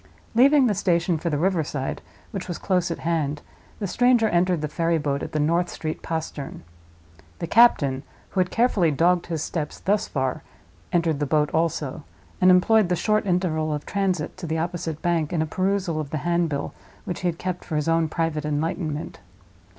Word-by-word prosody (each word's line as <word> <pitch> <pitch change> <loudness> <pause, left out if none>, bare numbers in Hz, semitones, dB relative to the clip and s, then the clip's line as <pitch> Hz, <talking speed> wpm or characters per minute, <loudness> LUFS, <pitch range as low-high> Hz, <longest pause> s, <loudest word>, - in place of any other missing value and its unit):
Leaving 270 +4 +6
the 220 - +2
station 175 -3 +1
for 170 - -2
the 150 - 0
river 175 +1 +1
side, 140 -2 -4 0.3
which 195 -4 -5
was 175 - -4
close 180 -2 0
at 170 - -3
hand, 155 -3 -1 0.3
the 205 - -3
stranger 240 +3 +3
entered 175 -2 +2
the 150 - -1
ferryboat 150 -3 0
at - - -5
the 155 - -1
North 170 +4 +1
Street 155 0 -5
Postern. 160 -4 -5 0.7
The - - -3
captain, 160 - +4 0.3
who 190 - -1
had 180 -1 +2
carefully 225 -8 +2
dogged 170 +4 +2
his 165 -3 -2
steps 150 -4 -4
thus 205 +1 +1
far, 130 -2 -2 0.5
entered 165 -4 +1
the 145 - -1
boat 150 0 +2
also; 160 -4 -1 0.4
and 185 - +6
employed 185 +2 +5
the 180 - +2
short 215 +3 +1
interval 165 -4 0
of 150 -1 -3
transit 190 -6 -1
to 175 - -6
the 160 +1 -1
opposite 165 -2 -3
bank 170 -3 +1
in 160 -3 +1
a - - -2
perusal 185 -1 -1
of 150 -3 -4
the 155 - -2
handbill 170 -5 0 0.3
which 180 - -4
he 180 - -1
had 170 -1 -1
kept 180 0 -4
for 160 - -5
his 150 0 0
own 165 -1 +2
private 165 -2 -1
enlightenment. 150 +1 -3
170 Hz, 190 wpm, -24 LUFS, 155-185 Hz, 0.7 s, Leaving